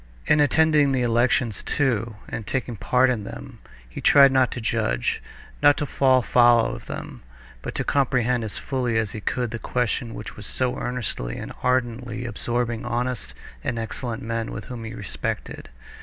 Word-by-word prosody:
In 150 Hz, -, +4 dB
attending 150 Hz, -1 st, +4 dB
the 130 Hz, -2 st, +1 dB
elections, 120 Hz, -2 st, +2 dB
too, 115 Hz, -6 st, 0 dB
and 110 Hz, -, -6 dB
taking 130 Hz, -3 st, -2 dB
part 125 Hz, +5 st, +3 dB
in 110 Hz, -4 st, -2 dB
them, 130 Hz, +3 st, -9 dB, 0.3 s
he -, -, -8 dB
tried 140 Hz, -1 st, +7 dB
now 130 Hz, -, +4 dB
not 130 Hz, -2 st, +3 dB
to -, -, -5 dB
judge, 110 Hz, -, 0 dB, 0.4 s
not 145 Hz, 0 st, +6 dB
to 150 Hz, -, -1 dB
fall 130 Hz, -2 st, +3 dB
foul 120 Hz, -1 st, +5 dB
of -, -, -9 dB
them, -, -, -7 dB, 0.4 s
but -, -, -6 dB
to -, -, -1 dB
comprehend 125 Hz, -3 st, +1 dB
as 110 Hz, -, -5 dB
fully 125 Hz, -4 st, -1 dB
as 110 Hz, -3 st, 0 dB
he 110 Hz, -, -6 dB
could 125 Hz, +2 st, -1 dB
the 115 Hz, -, -4 dB
question 120 Hz, -1 st, -1 dB
which 105 Hz, -, -7 dB
was 105 Hz, -2 st, -8 dB
so 125 Hz, -1 st, 0 dB
earnestly 115 Hz, -, -3 dB
and -, -, -6 dB
ardently 120 Hz, -1 st, -1 dB
absorbing 120 Hz, +1 st, -2 dB
honest 120 Hz, -, -3 dB, 0.3 s
and 120 Hz, -, -2 dB
excellent 115 Hz, 0 st, -4 dB
men 115 Hz, 0 st, -2 dB
whom 115 Hz, +1 st, -7 dB
he 115 Hz, +1 st, -6 dB
respected. 100 Hz, -, -5 dB
120 Hz, 170 wpm, -24 LUFS, 115-130 Hz, 0.4 s, tried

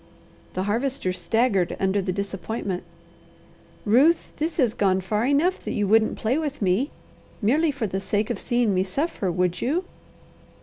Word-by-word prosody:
The 185 Hz, -, -1 dB
Harvester 230 Hz, -1 st, -1 dB
staggered 195 Hz, +1 st, +1 dB
under 195 Hz, +1 st, +1 dB
the 185 Hz, -1 st, -2 dB
disappointment. 195 Hz, 0 st, -3 dB, 1.0 s
"Ruth, 270 Hz, +11 st, +4 dB
this 315 Hz, +2 st, -2 dB
has 250 Hz, -8 st, +3 dB
gone 190 Hz, -4 st, +2 dB
far 210 Hz, +5 st, -1 dB
enough 310 Hz, +7 st, +2 dB
that -, -, -3 dB
you 205 Hz, -, 0 dB
wouldn't 220 Hz, +2 st, +3 dB
play 245 Hz, +7 st, 0 dB
with 295 Hz, -3 st, -3 dB
me, 200 Hz, +8 st, +1 dB, 0.5 s
merely 290 Hz, +10 st, +2 dB
for 280 Hz, -5 st, -2 dB
the 190 Hz, -1 st, -2 dB
sake 205 Hz, +2 st, -1 dB
of -, -, -3 dB
seeing 240 Hz, -4 st, +1 dB
me 185 Hz, -, +2 dB
suffer, 200 Hz, -, -2 dB
would 180 Hz, 0 st, 0 dB
you?" 330 Hz, +9 st, 0 dB
215 Hz, 160 wpm, -24 LUFS, 190-270 Hz, 1.0 s, Ruth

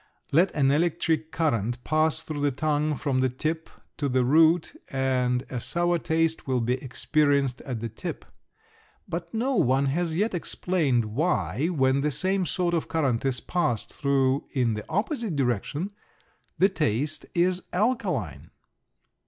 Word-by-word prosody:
Let 170 Hz, +6 st, +4 dB
an 135 Hz, -2 st, +3 dB
electric 160 Hz, 0 st, +1 dB
current 120 Hz, -, -1 dB
pass 155 Hz, 0 st, +1 dB
through 150 Hz, -2 st, -5 dB
the 145 Hz, -, +3 dB
tongue 150 Hz, +2 st, 0 dB
from 135 Hz, -2 st, -1 dB
the 130 Hz, 0 st, +2 dB
tip 155 Hz, +6 st, -3 dB, 0.3 s
to 145 Hz, -2 st, -1 dB
the 130 Hz, -1 st, +2 dB
root 160 Hz, +4 st, +4 dB
and 130 Hz, -2 st, 0 dB
a 125 Hz, -, -2 dB
sour 175 Hz, +6 st, 0 dB
taste 160 Hz, 0 st, 0 dB
will 130 Hz, -2 st, +1 dB
be 120 Hz, +1 st, +1 dB
experienced 140 Hz, -1 st, +1 dB
at 120 Hz, -4 st, -3 dB
the 115 Hz, -, -2 dB
tip. 110 Hz, -, -6 dB, 0.8 s
But 170 Hz, 0 st, -5 dB
no 245 Hz, +5 st, 0 dB
one 135 Hz, -, +3 dB
has 170 Hz, 0 st, -1 dB
yet 210 Hz, +5 st, 0 dB
explained 160 Hz, -8 st, 0 dB
why 110 Hz, -, 0 dB
when 135 Hz, -5 st, +2 dB
the 150 Hz, -, +1 dB
same 185 Hz, +5 st, +1 dB
sort 175 Hz, +3 st, 0 dB
of 165 Hz, -, 0 dB
current 135 Hz, -8 st, 0 dB
is 125 Hz, -3 st, 0 dB
passed 145 Hz, -11 st, -1 dB
through 135 Hz, -1 st, +1 dB
in 125 Hz, -4 st, +1 dB
the 105 Hz, 0 st, -6 dB
opposite 220 Hz, -, -1 dB
direction 140 Hz, -, -1 dB, 0.7 s
the 190 Hz, +5 st, +5 dB
taste 150 Hz, -, -1 dB
is 180 Hz, +1 st, +2 dB
alkaline. 200 Hz, -, -1 dB
150 Hz, 150 wpm, -26 LUFS, 130-170 Hz, 0.8 s, the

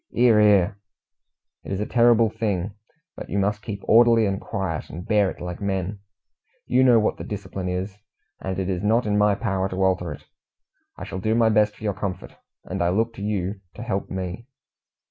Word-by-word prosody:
"'Ear, 120 Hz, -3 st, +5 dB
'ear!" 105 Hz, -1 st, +4 dB, 0.9 s
"It -, -, -8 dB
is 95 Hz, -, -2 dB
a 105 Hz, -, -1 dB
terrible 115 Hz, -2 st, +4 dB
thing, 100 Hz, -3 st, -2 dB, 0.4 s
but -, -, -8 dB
you 100 Hz, -, -2 dB
must 100 Hz, +1 st, 0 dB
keep 105 Hz, -2 st, -6 dB
orderly 115 Hz, 0 st, +5 dB
and 95 Hz, -1 st, -1 dB
quiet, 95 Hz, -5 st, -4 dB
and 90 Hz, +6 st, -8 dB
bear 105 Hz, -3 st, +3 dB
it -, -, -9 dB
like 90 Hz, +1 st, -6 dB
men. 100 Hz, 0 st, -2 dB, 0.7 s
You 130 Hz, +1 st, +3 dB
know 125 Hz, -3 st, +6 dB
what 110 Hz, -, +1 dB
the -, -, -6 dB
discipline 95 Hz, -2 st, -5 dB
is, 95 Hz, +3 st, -4 dB, 0.4 s
and 95 Hz, -1 st, -4 dB
it 95 Hz, -1 st, -2 dB
is 90 Hz, -2 st, -2 dB
not 110 Hz, +3 st, +2 dB
in 105 Hz, -1 st, 0 dB
my 105 Hz, 0 st, +3 dB
power 95 Hz, -3 st, -1 dB
to 95 Hz, +1 st, -1 dB
alter 90 Hz, -3 st, +1 dB
it. 75 Hz, +1 st, -9 dB, 0.7 s
I -, -, -7 dB
shall 95 Hz, -, -5 dB
do 110 Hz, +4 st, 0 dB
my 115 Hz, -1 st, +4 dB
best 105 Hz, -1 st, +3 dB
for -, -, -15 dB
your 105 Hz, -2 st, 0 dB
comfort, 95 Hz, -2 st, -5 dB, 0.3 s
and -, -, -4 dB
I 85 Hz, -, +2 dB
look 115 Hz, +5 st, 0 dB
to 100 Hz, -, -10 dB
you 100 Hz, -1 st, -2 dB
to -, -, -7 dB
help -, -, -3 dB
me." 95 Hz, +5 st, -5 dB
100 Hz, 205 wpm, -24 LUFS, 95-110 Hz, 0.9 s, know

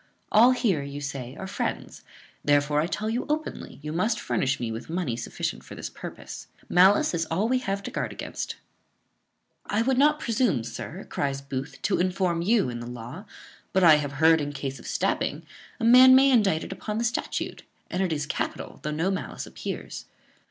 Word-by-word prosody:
All 230 Hz, +4 st, +7 dB
here 235 Hz, -, +2 dB
you 140 Hz, +1 st, -6 dB
say 140 Hz, -3 st, -5 dB
are 190 Hz, -, -6 dB
friends; 190 Hz, -, -4 dB, 0.4 s
therefore 145 Hz, +1 st, +3 dB
I 160 Hz, -, 0 dB
tell 215 Hz, +4 st, -3 dB
you 230 Hz, +3 st, -1 dB
openly, 310 Hz, +1 st, -3 dB
you 150 Hz, 0 st, -4 dB
must 215 Hz, +6 st, +1 dB
furnish 130 Hz, 0 st, 0 dB
me 115 Hz, -2 st, -2 dB
with 115 Hz, +6 st, -7 dB
money 165 Hz, -8 st, -1 dB
sufficient -, -, -4 dB
for -, -, -10 dB
this -, -, -6 dB
purpose. -, -, -9 dB, 0.2 s
Malice 190 Hz, +3 st, +5 dB
is 165 Hz, -1 st, -1 dB
all 190 Hz, +7 st, 0 dB
we 255 Hz, +1 st, +2 dB
have 200 Hz, -4 st, -3 dB
to -, -, -5 dB
guard -, -, -2 dB
against." -, -, -5 dB, 1.1 s
"I 215 Hz, +2 st, +1 dB
would 260 Hz, +1 st, +2 dB
not 300 Hz, +1 st, +4 dB
presume, 230 Hz, -, +1 dB
sir," 135 Hz, -, -7 dB
cries 140 Hz, -1 st, -2 dB
Booth, 135 Hz, 0 st, -6 dB
"to 200 Hz, -, +1 dB
inform 180 Hz, -1 st, +1 dB
you 205 Hz, +3 st, +3 dB
in 120 Hz, -1 st, -4 dB
the 120 Hz, -, -7 dB
law; 125 Hz, -, -8 dB, 0.5 s
but 190 Hz, 0 st, +3 dB
I 160 Hz, -3 st, +8 dB
have 145 Hz, -2 st, -3 dB
heard, 160 Hz, +3 st, +5 dB
in 145 Hz, 0 st, -3 dB
case 135 Hz, -1 st, -5 dB
of -, -, -11 dB
stabbing, -, -, -1 dB, 0.3 s
a -, -, -4 dB
man 255 Hz, +2 st, +9 dB
may 270 Hz, +1 st, +6 dB
be -, -, +4 dB
indicted 195 Hz, -10 st, +2 dB
upon 210 Hz, +2 st, -4 dB
the 230 Hz, -, 0 dB
statute; 235 Hz, 0 st, -2 dB, 0.3 s
and 180 Hz, -, -1 dB
it 185 Hz, -3 st, 0 dB
is 150 Hz, -2 st, -1 dB
capital, -, -, -4 dB
though 150 Hz, -, -3 dB
no 160 Hz, +5 st, 0 dB
malice 190 Hz, -, -4 dB
appears." -, -, -6 dB
175 Hz, 195 wpm, -26 LUFS, 145-215 Hz, 1.1 s, man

